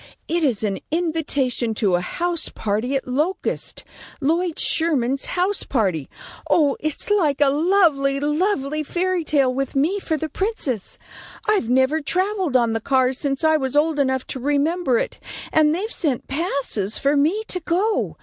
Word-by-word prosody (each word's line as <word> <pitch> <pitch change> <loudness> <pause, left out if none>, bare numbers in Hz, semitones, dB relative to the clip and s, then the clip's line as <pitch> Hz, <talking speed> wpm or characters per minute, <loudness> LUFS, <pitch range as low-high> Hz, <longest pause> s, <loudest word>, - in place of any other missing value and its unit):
It 335 0 0
is 240 -8 +1
an 200 -2 -1
invitation 290 -8 -1
to 205 -4 +1
a 175 - +2
house 340 - -1
party 220 +6 -2
at 270 - -2
Locust; 305 +10 -2 0.4
Lloyd 330 +3 0
Sherman's 275 -5 +2
house 380 +3 +1
party. 185 - -1 0.4
Oh, 290 -4 +3
it's 310 +6 -1
like 315 -9 +2
a 285 -2 +5
lovely, 300 -4 +2
lovely 300 -1 0
fairy 355 +3 -1
tale 275 -4 +2
with 270 +1 -3
me 325 +9 +1
for 320 -4 -2
the 315 - -3
princess. 300 - -2 0.5
I've 405 - +1
never 260 +5 +2
travelled 370 +1 -1
on 235 -3 +3
the 225 - -2
cars 260 +1 +1
since 275 0 -2
I 315 0 +4
was 265 -2 -2
old 300 0 +2
enough 265 -2 +1
to 260 - -6
remember 290 +1 +1
it, - - -3 0.3
and 310 0 +4
they've 420 +6 -3
sent 280 -7 -2
passes 275 - -1
for 280 +1 +1
me 320 +10 +2
to 365 - -1
go. 365 +6 0
290 Hz, 160 wpm, -22 LUFS, 260-340 Hz, 0.5 s, a